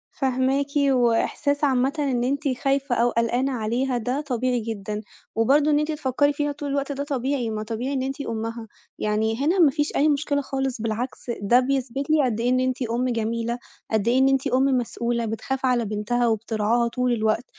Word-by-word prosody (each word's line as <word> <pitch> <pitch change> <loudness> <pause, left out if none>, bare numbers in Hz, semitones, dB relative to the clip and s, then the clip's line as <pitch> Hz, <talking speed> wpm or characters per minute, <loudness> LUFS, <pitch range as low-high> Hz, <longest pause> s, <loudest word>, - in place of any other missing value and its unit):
فاهماكِ، 265 +1 +1
وإحساس 280 +2 +2
عامةً 265 -1 +2
إن 260 -4 0
أنتِ 280 +4 -1 0.2
خايفة 275 -2 +1
أو 235 +1 +3
قلقانة 240 +3 0
عليها 245 +2 -1
ده 250 +5 -2
طبيعي 255 -3 -1
جدًا، 215 -2 -4 0.3
وبرضه 285 +7 +3
إن 295 - +4
أنتِ 300 +1 -1
تفكّري 290 -1 +1
فيها 290 0 -1
طول 290 0 -5
الوقت 280 0 -1
ده 280 0 -3
طبيعي، 265 -3 -1
ما 215 -1 -3
طبيعي 235 +5 -3
إن 260 - -1
أنتِ 270 +2 -4
أمها، 230 -2 -4 0.3
يعني 220 +1 0
هنا 355 +5 +2
مافيش 295 -2 +3
أي 300 +2 +4
مشكلة 285 0 +1
خالص 270 -3 -3
بالعكس 235 +2 -3
ده 235 +5 +5
بيثبت 270 +1 -2
لي 305 -3 +4
قد 230 -3 -1
إيه 240 +2 +1
إن 255 - +3
أنتِ 255 0 -1
أم 240 +2 0
جميلة، 230 0 -1 0.3
قد 220 -1 +1
إيه 245 +2 +4
إن 265 - +5
أنتِ 270 0 +1
أم 260 +1 +2
مسؤولة 240 -2 0
بتخاف 260 +4 -3
على 245 -2 +2
بنتها 215 +4 0
وبترعاها 225 +1 +1
طول 250 +1 0
الوقت، 220 +1 0
255 Hz, 185 wpm, -24 LUFS, 230-275 Hz, 0.3 s, ده